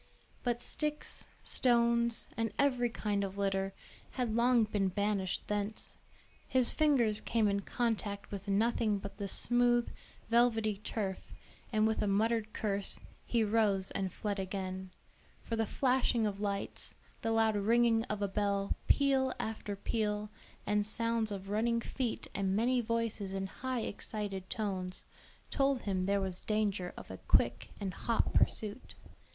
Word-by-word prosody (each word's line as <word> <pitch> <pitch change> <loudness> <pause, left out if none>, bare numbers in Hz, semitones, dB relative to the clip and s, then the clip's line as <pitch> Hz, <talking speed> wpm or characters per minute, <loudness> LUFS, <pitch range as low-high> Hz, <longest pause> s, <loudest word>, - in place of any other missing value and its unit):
But 240 -1 -1
sticks, 300 -1 -3 0.2
stones, 235 -2 +3
and 225 -1 -1
every 255 -4 +2
kind 205 -3 -1
of 195 0 -4
litter, 195 -1 0 0.4
had 245 -4 -1
long 240 0 +4
been 205 -2 0
banished 200 0 -1
thence; 210 +1 -2 0.5
his 255 -2 +4
fingers 255 -9 +3
came 225 -2 +2
in 200 0 +1
contact 210 -2 -2
with 200 0 -6
nothing 215 +1 +2
but 200 0 -8
the 200 -1 -3
smooth, 240 +3 +2 0.4
velvety 225 -3 +3
turf, 200 -2 -3 0.5
and 215 -1 +3
with 220 0 +1
a 210 - +1
muttered 220 +2 +1
curse, 200 -2 +2 0.3
he 235 -2 +2
rose 205 -3 +2
and 190 -1 -2
fled 205 +2 -3
again; 190 0 -4 0.5
for 230 - -2
the 225 -1 0
flashing 250 -3 +2
of 200 -1 -2
lights, 200 -1 -3 0.3
the 225 - -1
loud 225 -1 +3
ringing 225 +2 +3
of 210 -1 -3
a - - +2
bell, 200 0 0
peal 270 -2 +3
after 215 -2 -3
peal, 210 0 -1 0.3
and 210 0 +2
sounds 230 0 0
of 195 -1 -5
running 230 +2 +2
feet 240 0 -3
and 195 -1 0
many 245 +3 +2
voices 230 -4 -1
in 195 0 -1
high 255 +5 -3
excited 205 -3 -4
tones, 185 -4 -3 0.5
told 275 -2 +1
him 185 -2 -1
there 200 0 +2
was 185 -2 -1
danger 205 -4 0
of - - -9
a - - -6
quick - - +2
and 195 -3 -3
hot 230 +6 0
pursuit. 215 +4 +1
215 Hz, 145 wpm, -33 LUFS, 200-235 Hz, 0.5 s, long